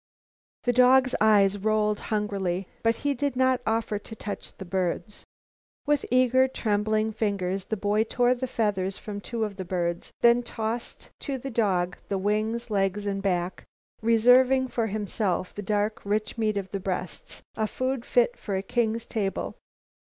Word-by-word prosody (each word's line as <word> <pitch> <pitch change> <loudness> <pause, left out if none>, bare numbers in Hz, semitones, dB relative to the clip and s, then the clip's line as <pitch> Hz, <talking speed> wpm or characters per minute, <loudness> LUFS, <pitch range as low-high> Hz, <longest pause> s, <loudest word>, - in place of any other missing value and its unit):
The 245 - +2
dog's 255 +1 +5
eyes 205 -2 +4
rolled 210 0 +1
hungrily, 195 -4 -1
but 230 0 +2
he 285 - +3
did 280 +1 -1
not 260 0 +2
offer 220 -2 0
to 220 - -10
touch 205 -1 -6
the 190 - -7
birds. 185 +2 -2 0.6
With 295 -1 +1
eager, 255 +1 +4
trembling 215 -2 0
fingers 195 -3 -1
the 220 - -2
boy 210 +2 +1
tore 245 +2 +2
the 255 +1 -3
feathers 200 -5 -1
from 205 -2 -6
two 230 +1 -3
of 205 -2 -4
the 190 - -4
birds, 175 -2 -2
then 235 0 +6
tossed 230 0 -5
to 275 -2 -3
the 270 +2 -6
dog 185 -6 +1
the 195 - 0
wings, 215 +4 -1
legs 200 0 0
and 195 -1 -2
back, 180 -2 -1 0.4
reserving 250 +3 +5
for 230 -2 -1
himself 205 -3 -2
the 205 - -5
dark, 210 +1 -1
rich 210 +1 -1
meat 215 -3 0
of 190 -1 -4
the 195 - -2
breasts, 185 -2 -5
a 220 - 0
food 255 +1 -2
fit - - +2
for 200 - -4
a 190 - -1
king's 230 +2 0
table. 200 -4 -2
215 Hz, 165 wpm, -26 LUFS, 195-240 Hz, 0.6 s, then